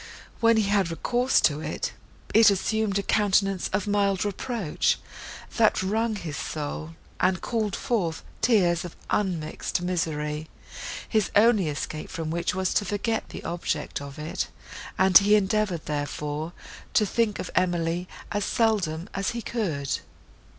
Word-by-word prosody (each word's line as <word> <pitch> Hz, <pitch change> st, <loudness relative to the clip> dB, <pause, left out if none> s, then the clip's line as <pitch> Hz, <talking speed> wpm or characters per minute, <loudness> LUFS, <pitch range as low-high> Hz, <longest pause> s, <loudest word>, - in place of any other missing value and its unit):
When 230 Hz, 0 st, +5 dB
he 220 Hz, -, +4 dB
had 200 Hz, -3 st, +2 dB
recourse 245 Hz, +9 st, +2 dB
to 150 Hz, -1 st, +3 dB
it, -, -, -3 dB, 0.4 s
it 225 Hz, -1 st, +8 dB
assumed 205 Hz, +1 st, +1 dB
a 200 Hz, -, 0 dB
countenance 195 Hz, -3 st, +2 dB
of 200 Hz, 0 st, 0 dB
mild 200 Hz, -2 st, +1 dB
reproach, 205 Hz, -3 st, 0 dB, 0.6 s
that 220 Hz, -4 st, +4 dB
wrung 220 Hz, +3 st, 0 dB
his 160 Hz, -7 st, -5 dB
soul, 155 Hz, +1 st, -4 dB, 0.2 s
and 185 Hz, -1 st, +2 dB
called 215 Hz, -4 st, -1 dB
forth 180 Hz, -9 st, -1 dB, 0.2 s
tears 190 Hz, -8 st, +3 dB
of 175 Hz, -, -8 dB, 0.2 s
unmixed 175 Hz, -5 st, -1 dB
misery; 155 Hz, -3 st, -2 dB, 0.6 s
his 215 Hz, -3 st, +1 dB
only 210 Hz, -4 st, +5 dB
escape 155 Hz, +1 st, -4 dB
from 160 Hz, -2 st, -4 dB
which 170 Hz, +2 st, -1 dB
was 190 Hz, 0 st, 0 dB
to 205 Hz, -, +2 dB
forget 210 Hz, +4 st, -1 dB
the -, -, -8 dB
object 170 Hz, -3 st, -3 dB
of 140 Hz, -1 st, -8 dB
it, 155 Hz, +2 st, -3 dB, 0.5 s
and 190 Hz, 0 st, +8 dB
he 205 Hz, +1 st, +4 dB
endeavoured, 205 Hz, -4 st, +1 dB
therefore, 150 Hz, +2 st, -3 dB, 0.4 s
to 210 Hz, -, +5 dB
think 215 Hz, +1 st, +1 dB
of -, -, -5 dB
Emily 175 Hz, 0 st, 0 dB, 0.2 s
as 205 Hz, 0 st, 0 dB
seldom 195 Hz, -8 st, +1 dB
as 195 Hz, 0 st, -1 dB
he 235 Hz, -, -4 dB
could. 160 Hz, -, -2 dB
190 Hz, 145 wpm, -26 LUFS, 165-210 Hz, 0.6 s, it